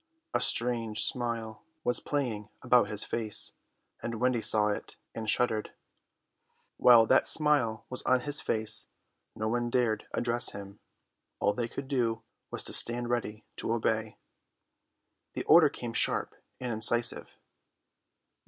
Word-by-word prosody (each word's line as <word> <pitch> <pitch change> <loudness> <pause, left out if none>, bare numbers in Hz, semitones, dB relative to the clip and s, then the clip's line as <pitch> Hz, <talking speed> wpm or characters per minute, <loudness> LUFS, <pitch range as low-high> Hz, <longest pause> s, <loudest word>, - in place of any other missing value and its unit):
A - - +1
strange 115 -3 0
smile 115 -3 -3 0.2
was 125 - +1
playing 115 -8 -3
about 125 -4 +4
his 105 -1 +3
face, 110 -3 0 0.5
and 115 -2 -5
Wendy 125 -1 +1
saw 105 -1 +4
it 105 - -5 0.2
and 110 -1 -5
shuddered. 110 -2 0 1.0
While 120 -2 +7
that 130 +4 +3
smile 145 -8 +1
was 125 - -2
on 130 -1 +2
his 145 +2 +1
face 110 0 0 0.5
no 110 - -3
one 120 +1 -1
dared 115 -4 0
address 120 0 +1
him; 100 0 -10 0.6
all 100 - +1
they 120 0 -3
could 135 +3 -7
do 115 -5 -1 0.3
was - - -3
to - - -1
stand 120 0 +1
ready 110 -3 -3
to - - -3
obey. 110 -1 -1 1.2
The - - -4
order - - +6
came - - -7
sharp - - +1 0.3
and 125 -2 -3
incisive. 120 +2 +1
115 Hz, 135 wpm, -29 LUFS, 110-125 Hz, 1.2 s, While